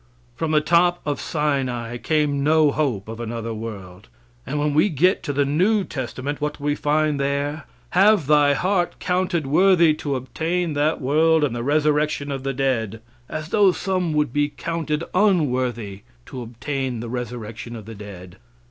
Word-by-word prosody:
From 160 +4 -2
the 155 -1 +3
top 175 +2 +3
of 145 -3 -2
Sinai 130 -6 -1
came 145 +2 0
no 155 0 +4
hope 130 -10 -1
of 115 +1 -7
another 115 0 -4
world. 105 -3 -8 0.4
And 145 +3 -2
when 145 0 0
we 155 +8 +4
get 180 +4 +2
to - - -3
the 145 0 +1
new 190 +9 +2
testament, 135 0 -5
what 150 0 -2
do 145 - -12
we 145 0 +1
find 150 0 +1
there? 140 +2 -2 0.3
Have 195 -2 +4
thy 145 0 +4
heart 180 +2 0
counted 180 -3 -1
worthy 170 +2 +4
to 145 -2 -3
obtain 160 +7 -2
that 150 +2 +1
world 155 +4 +3
and 135 -5 0
the 120 - -3
resurrection 150 +1 +1
of 135 -1 -3
the 135 +1 -2
dead. 120 -5 -1 0.3
As 155 +1 -5
though 200 0 +5
some 185 -2 -1
would 150 -5 0
be 145 0 +1
counted 165 -1 -3
unworthy 125 - +1 0.2
to 130 - -7
obtain 125 +1 -4
the 120 - -5
resurrection 120 -1 -6
of 110 -3 -9
the 115 - -8
dead. 100 -3 -10
145 Hz, 170 wpm, -22 LUFS, 120-160 Hz, 0.4 s, though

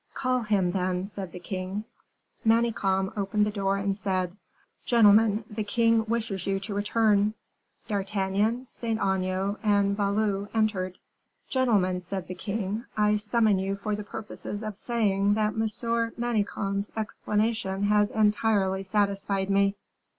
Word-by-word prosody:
"Call 255 -1 +1
him, 200 -5 +1
then," 185 0 -1
said 195 -3 -7
the - - -8
king. 185 +3 -4 0.6
Manicamp 220 -4 +2
opened 210 +1 +1
the 210 - -1
door, 195 -1 0
and 195 0 -1
said, 185 -3 -2 0.5
"Gentlemen, 220 -1 +5
the 215 0 -4
king 230 +1 +2
wishes 220 -4 -2
you 195 0 +1
to 205 +1 -5
return." 210 0 +2 0.5
D'Artagnan, 205 +3 0
Saint 225 -2 -3
Aignan, 190 +1 0
and 200 -2 +2
Valot 200 0 0
entered. 195 -4 0 0.5
"Gentlemen," 205 -9 +2
said 180 +1 -5
the 185 - -5
king, 205 +4 -3
"I 210 0 +3
summoned 210 -2 +2
you 195 +1 -1
for 205 +1 -2
the 210 - -5
purposes 205 0 -7
of 215 -2 -4
saying 205 -3 +1
that 215 -1 0
Monsieur 230 +1 0
de 230 - -17
Manicamp's 205 -3 -1
explanation 210 -2 -1
has 205 0 +3
entirely 210 -3 +2
satisfied 200 0 0
me." 200 0 +3
205 Hz, 135 wpm, -27 LUFS, 195-220 Hz, 0.6 s, Gentlemen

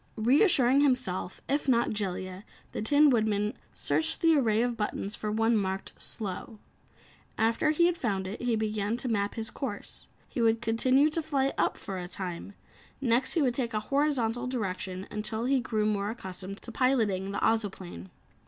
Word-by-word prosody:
Reassuring 265 - +4
himself, 250 -10 0
if 285 0 0
not 235 -2 +3
Jellia, 190 -2 -3 0.3
the - - -4
Tin 285 +6 +5
Woodman 215 -3 +1 0.2
searched 320 0 +1
the 330 -2 +5
array 230 -5 +3
of 245 -1 -1
buttons 210 -1 -3
for 210 - -3
one 225 +2 +2
marked 190 -2 -2
"slow." 215 +1 -5 0.8
After 225 +7 +2
he 310 +3 +4
had 345 -1 +1
found 195 -6 -1
it, 195 +3 -5
he - - -4
slowly 240 -2 +2
began 215 0 -1
to 255 - -3
map 205 -3 0
his 225 -2 -3
course. 240 -8 -5 0.2
He 245 - -3
would 225 0 +3
continue 255 +5 +3
to 330 - 0
fly 275 -3 0
up, - - +1
for 195 -2 -5
a 180 - -5
time. 180 +1 -6 0.5
Next 250 -1 +1
he 330 - +2
would 250 -3 +2
take 235 -3 -2
a - - +2
horizontal 255 -4 +1
direction 190 -6 -3
until 220 +2 -2
he 270 +1 +3
grew 220 -3 -1
more 205 -1 0
accustomed 190 -3 -7
to 235 - -6
piloting 220 -7 +1
the 200 - -3
Ozoplane. 190 - -1
225 Hz, 175 wpm, -29 LUFS, 200-255 Hz, 0.8 s, Tin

